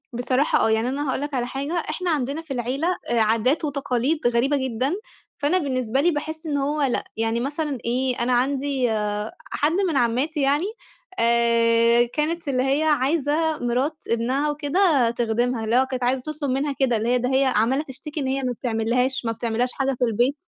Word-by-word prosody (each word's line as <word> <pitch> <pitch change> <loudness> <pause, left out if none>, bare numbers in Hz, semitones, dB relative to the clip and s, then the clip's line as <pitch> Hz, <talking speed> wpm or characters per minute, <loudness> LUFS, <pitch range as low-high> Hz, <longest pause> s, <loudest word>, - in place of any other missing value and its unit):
بصراحة 255 +4 +1
آه، - - +2
يعني 220 +2 +1
أنا 285 +2 -2
هاقول 260 - -1
لك 290 0 -4
على 245 -2 -1
حاجة 275 +5 -4
إحنا 345 +1 -2
عندنا 285 +1 -1
في 325 -3 -13
العيلة 255 +6 -1 0.2
آآ، 240 -1 +2
عادات 230 +8 +2
وتقاليد 280 0 0
غريبة 245 +4 +2
جدًا، 260 +2 -1 0.4
فأنا 290 +6 +1
بالنسبة 260 -5 0
لي 345 +4 +3
باحِسّ 315 +1 -5
إن 295 -2 -1
هو 290 +2 -1
لأ، 270 -4 +1
يعني 225 +1 0
مثلًا 290 +2 -2
إيه 250 +2 0
أنا 245 +1 +1
عندي 265 0 +1 0.6
حد 295 +2 +1 0.2
من 305 - 0
عمّاتي 265 +6 0
يعني، 285 +5 +2 0.5
آآ، 235 0 +4
كانت 320 +2 -1
اللي 255 -2 +1
هي 275 +3 +1
عايزة 305 +2 +1
مرات 255 +6 -1
ابنها 255 +6 0
وكده 295 -3 +2
تخدِمها، 235 0 -1
اللي 225 +2 +1
هو 260 +1 +4
كانت 255 -1 -4
عايزة 255 +4 0
تطلب 290 -3 -3
منها 275 +3 0
كده، 255 -4 +2
اللي 225 +2 -1
هي 250 - +3
ده 250 +1 -1
هي 270 +1 +4
عمّالة 260 +3 +2
تشتكي 300 +2 -7
إن 270 - -2
هي 270 +1 -1
ما 250 - 0
بتعملّهاش 245 +3 -1
ما 230 - 0
بتعملّهاش 235 +2 -1
حاجة 270 -1 -1
في 250 - +3
البيت، 240 +5 +1
265 Hz, 185 wpm, -23 LUFS, 240-290 Hz, 0.6 s, آآ